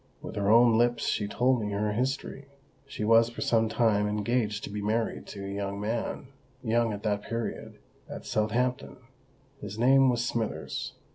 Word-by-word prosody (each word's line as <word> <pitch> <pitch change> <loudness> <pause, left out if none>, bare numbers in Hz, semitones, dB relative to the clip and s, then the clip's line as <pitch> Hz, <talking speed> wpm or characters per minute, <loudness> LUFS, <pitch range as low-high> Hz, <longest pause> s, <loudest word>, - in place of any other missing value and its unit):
With - - -7
her 100 0 0
own 115 0 +6
lips 120 0 +2
she 105 - 0
told 125 +3 +1
me 105 -1 -3
her 105 +1 0
history. 135 +3 -3 0.4
She 125 - -5
was 115 +1 +5
for 120 - -8
some 115 -1 +2
time 110 -3 +2
engaged 105 0 -1
to - - -6
be 105 0 -4
married 110 +2 -1
to 100 -1 -7
a - - -5
young 100 0 -4
man—young 120 +1 -2
at 100 -1 -6
that 105 -2 0
period—at 115 +1 -7
Southampton. 125 +5 -1 0.6
His 105 +1 -7
name 135 +3 +5
was 120 -1 0
Smithers. 115 -2 -3
115 Hz, 160 wpm, -28 LUFS, 105-120 Hz, 0.6 s, own